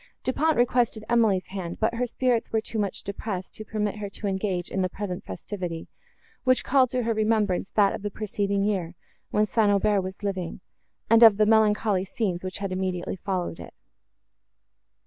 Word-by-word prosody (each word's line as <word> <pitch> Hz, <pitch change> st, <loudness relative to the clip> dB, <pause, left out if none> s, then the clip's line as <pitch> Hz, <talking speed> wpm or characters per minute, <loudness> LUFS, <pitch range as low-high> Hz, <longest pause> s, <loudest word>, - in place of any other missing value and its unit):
Du 255 Hz, -, 0 dB
Pont 315 Hz, +3 st, +2 dB
requested 240 Hz, -2 st, +2 dB
Emily's 220 Hz, -6 st, +3 dB
hand, 180 Hz, -3 st, -5 dB
but 225 Hz, +1 st, +1 dB
her 245 Hz, +1 st, -1 dB
spirits 245 Hz, -1 st, 0 dB
were 220 Hz, -, +2 dB
too 220 Hz, 0 st, -5 dB
much 200 Hz, -2 st, -2 dB
depressed, 200 Hz, -2 st, -5 dB
to 215 Hz, -, -7 dB
permit 210 Hz, -1 st, -2 dB
her 205 Hz, -1 st, -5 dB
to 205 Hz, -, -8 dB
engage 190 Hz, -2 st, -2 dB
in 195 Hz, -, 0 dB
the 185 Hz, -, 0 dB
present 185 Hz, -2 st, -5 dB
festivity, 165 Hz, -, -5 dB, 0.6 s
which 255 Hz, -1 st, +3 dB
called 260 Hz, -2 st, +3 dB
to 250 Hz, 0 st, -1 dB
her 230 Hz, 0 st, +1 dB
remembrance 215 Hz, -4 st, +1 dB
that 200 Hz, -2 st, +3 dB
of -, -, -5 dB
the 205 Hz, -, -2 dB
preceding 200 Hz, -1 st, -1 dB
year, 185 Hz, -4 st, -1 dB, 0.3 s
when 210 Hz, 0 st, +2 dB
St. 215 Hz, 0 st, +2 dB
Aubert 205 Hz, 0 st, +3 dB
was 190 Hz, +2 st, -7 dB
living, 190 Hz, -4 st, -3 dB, 0.5 s
and 230 Hz, +1 st, +5 dB
of 225 Hz, -4 st, +9 dB
the 215 Hz, -, +4 dB
melancholy 210 Hz, -3 st, +3 dB
scenes, 190 Hz, -2 st, -2 dB
which 185 Hz, 0 st, -4 dB
had 195 Hz, -2 st, -4 dB
immediately 185 Hz, -1 st, -2 dB
followed 185 Hz, -3 st, -3 dB
it. -, -, -10 dB
205 Hz, 185 wpm, -26 LUFS, 190-220 Hz, 0.6 s, of